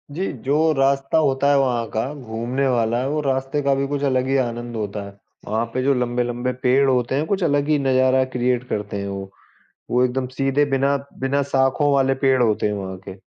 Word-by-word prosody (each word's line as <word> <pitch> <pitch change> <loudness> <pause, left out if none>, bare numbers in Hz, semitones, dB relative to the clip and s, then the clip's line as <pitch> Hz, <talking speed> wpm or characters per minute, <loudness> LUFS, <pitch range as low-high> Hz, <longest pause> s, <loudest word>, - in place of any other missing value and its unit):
जी, 190 +4 -2
जो 135 +4 -1 0.2
रास्ता 135 +1 +1
होता 140 -2 +2
है 140 - +4
वहाँ 125 -3 +1
का 120 +6 -2
घूमने 125 0 -3
वाला, 120 0 +1
वो 150 +2 -1
रास्ते 135 +1 -1
का 140 -1 +2
भी 140 0 -1
कुछ 145 0 -3
अलग 130 0 0
ही 135 +1 +2
आनंद 120 0 -5
होता 105 -1 -4
है। 100 - -11 0.3
वहाँ 110 +2 0
पे 130 - -1
जो 140 +1 +3
लंबे-लंबे 120 0 -1
पेड़ 135 +2 +4
होते 125 0 +1
हैं, 145 +3 0
कुछ 195 0 0
अलग 145 -3 +1
ही 155 -1 +3
नज़ारा 130 -1 +3
क्रिएट 125 0 0
करते 105 -1 -3
हैं 100 - -4
वो। 100 -1 -6 0.6
वो 125 +1 +3
एकदम 130 +1 -1
सीधे 135 +1 +2
बिना 135 +1 +2 0.2
बिना 135 +2 +1
शाखों 140 +1 +1
वाले 135 -1 +3
पेड़ 130 -2 +4
होते 110 -3 +1
हैं 105 - -1
वहाँ 95 -2 -5
के। 95 - -8
130 Hz, 205 wpm, -21 LUFS, 120-140 Hz, 0.6 s, है